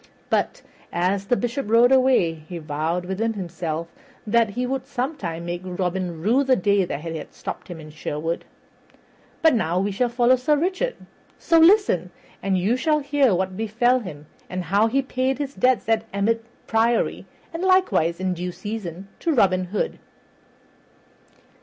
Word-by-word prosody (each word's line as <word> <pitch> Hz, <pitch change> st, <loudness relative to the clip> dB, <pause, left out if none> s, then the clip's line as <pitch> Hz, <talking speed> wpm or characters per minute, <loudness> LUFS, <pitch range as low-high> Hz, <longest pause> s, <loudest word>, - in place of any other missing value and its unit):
But, -, -, 0 dB, 0.3 s
as 190 Hz, +3 st, 0 dB
the 245 Hz, -, +2 dB
Bishop 245 Hz, -1 st, -2 dB
rode 235 Hz, +3 st, +5 dB
away, 255 Hz, -10 st, +4 dB
he 160 Hz, +2 st, -9 dB
vowed 160 Hz, +3 st, -2 dB
within 215 Hz, +5 st, -1 dB
himself 170 Hz, -4 st, -4 dB, 0.3 s
that 225 Hz, +1 st, +3 dB
he 245 Hz, +5 st, -2 dB
would 265 Hz, +1 st, -3 dB
sometime 245 Hz, -, -3 dB
make 175 Hz, 0 st, -4 dB
Robin 180 Hz, -2 st, -3 dB
rue 245 Hz, +8 st, +3 dB
the 265 Hz, -1 st, +3 dB
day 200 Hz, -1 st, +2 dB
that 150 Hz, -, -4 dB
he 160 Hz, -2 st, -5 dB
stopped -, -, -7 dB
him 175 Hz, -3 st, -8 dB
in 155 Hz, -1 st, -11 dB
Sherwood. 155 Hz, +2 st, -3 dB, 1.0 s
But 320 Hz, -2 st, +6 dB
now 180 Hz, -6 st, +1 dB
we 200 Hz, +2 st, 0 dB
shall 240 Hz, +5 st, 0 dB
follow 240 Hz, +1 st, +3 dB
Sir 275 Hz, +4 st, +2 dB
Richard; 370 Hz, +11 st, -1 dB, 0.4 s
so 330 Hz, -, +3 dB
listen, 325 Hz, -, +5 dB, 0.3 s
and 195 Hz, -1 st, +1 dB
you 200 Hz, +7 st, +2 dB
shall 305 Hz, +4 st, +2 dB
hear 280 Hz, -6 st, +2 dB
what 185 Hz, +1 st, -2 dB
befell 235 Hz, +4 st, +2 dB
him, 155 Hz, -10 st, -9 dB, 0.2 s
and 180 Hz, 0 st, -3 dB
how 200 Hz, +6 st, +3 dB
he 270 Hz, +4 st, +1 dB
paid 260 Hz, 0 st, -1 dB
his 280 Hz, -1 st, -4 dB
debts 255 Hz, -4 st, +2 dB
at 225 Hz, -1 st, +1 dB
Emmet 225 Hz, +3 st, 0 dB, 0.2 s
Priory, 230 Hz, +1 st, +1 dB, 0.3 s
and 330 Hz, -, -4 dB
likewise 370 Hz, -, +2 dB
in 185 Hz, -1 st, 0 dB
due 180 Hz, +1 st, -4 dB
season 195 Hz, -3 st, -6 dB
to 335 Hz, -, 0 dB
Robin 185 Hz, -9 st, +3 dB
Hood. 195 Hz, +4 st, -3 dB
205 Hz, 160 wpm, -23 LUFS, 175-255 Hz, 1.0 s, But